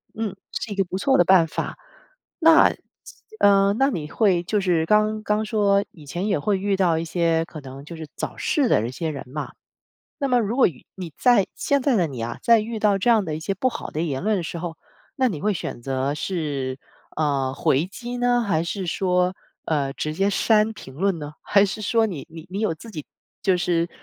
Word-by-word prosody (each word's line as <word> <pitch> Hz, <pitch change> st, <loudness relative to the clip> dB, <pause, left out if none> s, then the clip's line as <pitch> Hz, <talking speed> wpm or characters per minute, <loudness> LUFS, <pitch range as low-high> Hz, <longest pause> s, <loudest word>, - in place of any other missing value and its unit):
嗯， 215 Hz, -3 st, -3 dB, 0.2 s
是 220 Hz, -, -4 dB
一 -, -, -3 dB
个 195 Hz, -, +2 dB
不 185 Hz, -, -4 dB
错 265 Hz, +7 st, +3 dB
的 175 Hz, -, +6 dB
办 180 Hz, -3 st, +5 dB
法。 -, -, -4 dB, 0.6 s
那， 325 Hz, -1 st, +7 dB
这 -, -, -11 dB, 1.0 s
那 270 Hz, +2 st, +3 dB
你 155 Hz, -, -4 dB
会 185 Hz, -6 st, +2 dB
就 205 Hz, +3 st, 0 dB
是 170 Hz, -4 st, +1 dB
刚 215 Hz, +2 st, +2 dB
刚 210 Hz, 0 st, 0 dB
说 205 Hz, -2 st, +2 dB
以 155 Hz, -4 st, -15 dB
前 175 Hz, +8 st, -3 dB
也 200 Hz, -, +1 dB
会 200 Hz, +6 st, +1 dB
遇 200 Hz, +1 st, 0 dB
到 175 Hz, -4 st, +2 dB
一 165 Hz, -, -3 dB
些， 165 Hz, -1 st, +1 dB
可 155 Hz, -, -9 dB
能 135 Hz, +1 st, -10 dB
就 170 Hz, -, -8 dB
是 160 Hz, -1 st, -8 dB
找 -, -, -5 dB
事 290 Hz, -7 st, +1 dB
的 110 Hz, +2 st, +2 dB
一 -, -, -5 dB
些 160 Hz, +4 st, -3 dB
人 140 Hz, -3 st, -5 dB
嘛， 150 Hz, +1 st, -5 dB, 0.7 s
那 280 Hz, -, 0 dB
么 250 Hz, -2 st, +3 dB
如 225 Hz, +1 st, -1 dB
果 270 Hz, -, +5 dB
遇 145 Hz, -8 st, -10 dB
你 180 Hz, -4 st, -7 dB
在 245 Hz, -6 st, +4 dB
现 280 Hz, -1 st, +1 dB
在 260 Hz, -3 st, +2 dB
的 175 Hz, -5 st, +2 dB
你 130 Hz, -5 st, -6 dB
啊， 115 Hz, +1 st, -4 dB
在 230 Hz, -1 st, +6 dB
遇 225 Hz, +1 st, -4 dB
到 205 Hz, -2 st, +3 dB
这 215 Hz, +5 st, +1 dB
样 220 Hz, -4 st, +4 dB
的 155 Hz, -3 st, -3 dB
一 -, -, -5 dB
些 160 Hz, +5 st, -2 dB
不 255 Hz, -, 0 dB
好 -, -, -6 dB
的 155 Hz, -, -2 dB
言 150 Hz, -2 st, -2 dB
论 215 Hz, -1 st, +2 dB
的 175 Hz, -, -3 dB
时 170 Hz, -, -5 dB
候， 170 Hz, -1 st, -5 dB, 0.4 s
那 260 Hz, -1 st, +2 dB
你 175 Hz, -10 st, -4 dB
会 210 Hz, +1 st, +1 dB
选 140 Hz, -8 st, -5 dB
择 135 Hz, +2 st, -1 dB
是， 145 Hz, -7 st, -3 dB, 0.4 s
呃， 140 Hz, -4 st, 0 dB
回 145 Hz, +2 st, +1 dB
击 240 Hz, +5 st, -7 dB
呢？ 245 Hz, 0 st, +2 dB
还 165 Hz, -7 st, 0 dB
是 185 Hz, +2 st, -3 dB
说， 180 Hz, +1 st, +1 dB, 0.3 s
呃， 140 Hz, -4 st, 0 dB
直 155 Hz, -, -3 dB
接 195 Hz, +5 st, +1 dB
删 215 Hz, +2 st, +3 dB
评 130 Hz, -, -11 dB
论 190 Hz, +1 st, 0 dB
呢？ 150 Hz, 0 st, -7 dB
还 200 Hz, 0 st, +4 dB
是 210 Hz, +2 st, -5 dB
说 225 Hz, +2 st, +2 dB
你 170 Hz, -8 st, -6 dB
你 160 Hz, 0 st, -10 dB
你 195 Hz, +3 st, -4 dB
有 215 Hz, -7 st, +1 dB
自 220 Hz, +8 st, -12 dB
己 155 Hz, -6 st, -7 dB, 0.4 s
就 190 Hz, -3 st, +2 dB
是， 170 Hz, 0 st, 0 dB
185 Hz, 240 characters per minute, -23 LUFS, 155-215 Hz, 1.0 s, 那